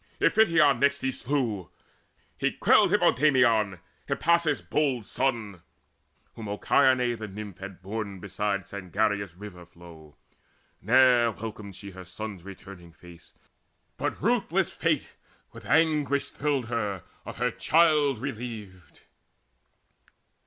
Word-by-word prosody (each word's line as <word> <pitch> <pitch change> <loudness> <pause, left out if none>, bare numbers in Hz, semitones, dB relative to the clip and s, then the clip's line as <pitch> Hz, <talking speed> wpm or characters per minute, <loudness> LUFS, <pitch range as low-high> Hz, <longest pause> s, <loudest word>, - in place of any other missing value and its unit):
Iphition 165 - +4
next 140 +1 +2
he 135 - 0
slew: 120 - -2 0.7
He - - 0
quelled - - +4
Hippomedon, 120 -8 +3 0.3
Hippasus' 160 +1 +1
bold 135 -7 0
son, 110 -9 -2 0.7
Whom 110 -2 -8
Ocyone 125 +4 +2
the 110 -1 -6
Nymph 100 -2 -9
had 95 -1 -9
borne 100 -1 -5
beside 100 +1 -2
Sangarius' 100 -1 -2
river 95 -3 -10
flow. 85 -3 -15 0.7
Ne'er 120 +1 +5
welcomed 105 -3 -8
she 100 +1 -9
Her 95 0 -10
son's 100 +1 -7
returning 95 -2 -12
face, 85 +1 -16 0.6
but - - -3
ruthless - - 0
Fate - - -1 0.3
With - - -12
anguish 150 -3 +2
thrilled 140 -5 -1
her 105 -6 -2 0.2
of - - -9
her 125 +1 0
child 150 -4 +3
bereaved. 110 - -7
110 Hz, 110 wpm, -27 LUFS, 100-135 Hz, 0.7 s, Ne'er